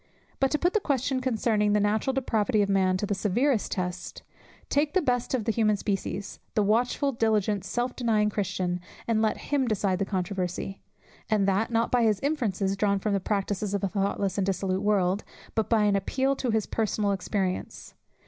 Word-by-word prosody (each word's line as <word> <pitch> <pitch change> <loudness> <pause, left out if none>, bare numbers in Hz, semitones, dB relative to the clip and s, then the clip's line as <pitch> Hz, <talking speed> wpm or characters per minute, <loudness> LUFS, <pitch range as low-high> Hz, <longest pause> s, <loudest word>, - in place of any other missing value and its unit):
But 270 - +3
to 300 - +1
put 350 +4 +1
the 430 - +3
question 270 - 0
concerning 220 -4 +1
the 210 - +4
natural 210 +5 +1
depravity 220 -5 +1
of 200 - -2
man 190 -1 +3
to 205 - -2
the 205 - -1
severest 220 +5 +1
test: 180 -1 -4 0.4
take 295 +4 +1
the - - +6
best 250 -1 0
of 230 -5 -2
the 225 - +2
human 215 -2 +2
species, 195 -1 -3 0.2
the 210 - +3
watchful 245 +7 +1
diligent 215 -4 +1
self 240 +6 -2
denying 215 -4 +1
Christian, 185 -3 -1 0.3
and 225 -2 +2
let 220 -1 +1
him 280 -3 -1
decide 195 -4 0
the 195 - +1
controversy; 190 0 -3 0.5
and 210 -3 +2
that, 195 +3 +1
not 230 0 +1
by 235 -3 +4
inferences 210 -10 0
drawn 200 0 +1
from 205 +1 -1
the 200 - +2
practices 200 0 -1
of 200 - -2
a - - +3
thoughtless 200 0 -1
and 190 - +1
dissolute 190 0 0
world, 200 -1 +1 0.3
but 220 - 0
by 225 -2 +3
an 205 -1 +3
appeal 265 +8 0
to 255 - -2
his 220 -2 +1
personal 215 -2 0
experience. 190 -1 -3
210 Hz, 185 wpm, -27 LUFS, 195-235 Hz, 0.5 s, the